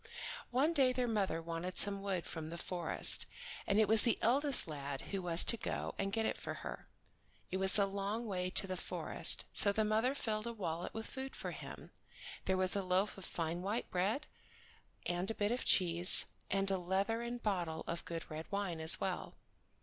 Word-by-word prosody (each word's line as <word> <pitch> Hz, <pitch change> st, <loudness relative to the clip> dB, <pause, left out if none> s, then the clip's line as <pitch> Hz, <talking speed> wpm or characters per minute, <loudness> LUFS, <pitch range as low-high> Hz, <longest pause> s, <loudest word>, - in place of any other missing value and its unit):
One 280 Hz, +7 st, 0 dB
day 270 Hz, -5 st, +2 dB
their 250 Hz, -1 st, -2 dB
mother 195 Hz, -7 st, -2 dB
wanted 170 Hz, +2 st, -6 dB
some 200 Hz, -1 st, +4 dB
wood 190 Hz, -3 st, -4 dB
from 160 Hz, -1 st, -7 dB
the 170 Hz, -, -8 dB
forest, 175 Hz, -1 st, +3 dB, 0.4 s
and 200 Hz, +1 st, +1 dB
it 215 Hz, -, +3 dB
was 220 Hz, +1 st, +5 dB
the 235 Hz, -, +1 dB
eldest 270 Hz, +1 st, +4 dB
lad 140 Hz, -3 st, -7 dB
who 195 Hz, -1 st, -3 dB
was 175 Hz, -1 st, +4 dB
to 230 Hz, -, -2 dB
go -, -, -5 dB
and 195 Hz, 0 st, -3 dB
get 220 Hz, +1 st, -2 dB
it -, -, -3 dB
for -, -, -7 dB
her. -, -, -8 dB, 0.6 s
It 190 Hz, -, -2 dB
was 190 Hz, +1 st, +1 dB
a 200 Hz, -, +2 dB
long 200 Hz, +4 st, -5 dB
way 185 Hz, -4 st, -4 dB
to 195 Hz, -, +3 dB
the 185 Hz, -1 st, -5 dB
forest, -, -, +3 dB
so 200 Hz, -, +8 dB
the 215 Hz, +1 st, -1 dB
mother 220 Hz, +5 st, 0 dB
filled 215 Hz, -4 st, -4 dB
a 235 Hz, -, -5 dB
wallet 175 Hz, -5 st, -6 dB
with 225 Hz, 0 st, -6 dB
food 265 Hz, 0 st, -8 dB
for -, -, -6 dB
him. -, -, -11 dB, 0.5 s
There 190 Hz, -, -1 dB
was 185 Hz, 0 st, 0 dB
a 200 Hz, -, -1 dB
loaf 185 Hz, +2 st, -1 dB
of 195 Hz, -, -10 dB
fine 165 Hz, +1 st, -3 dB
white 205 Hz, +5 st, -4 dB
bread, 205 Hz, +11 st, -2 dB, 0.8 s
and 175 Hz, +3 st, -3 dB
a 225 Hz, -, -4 dB
bit 205 Hz, +1 st, -2 dB
of 245 Hz, -, -3 dB
cheese, 175 Hz, -1 st, +7 dB, 0.2 s
and 195 Hz, 0 st, 0 dB
a 190 Hz, -, -1 dB
leathern 225 Hz, +7 st, -3 dB
bottle 175 Hz, -8 st, -4 dB
of 170 Hz, 0 st, -6 dB
good 165 Hz, -1 st, -7 dB
red 155 Hz, +4 st, -9 dB
wine 200 Hz, -5 st, -4 dB
as 160 Hz, 0 st, +6 dB
well. -, -, -5 dB
195 Hz, 200 wpm, -33 LUFS, 175-220 Hz, 0.8 s, so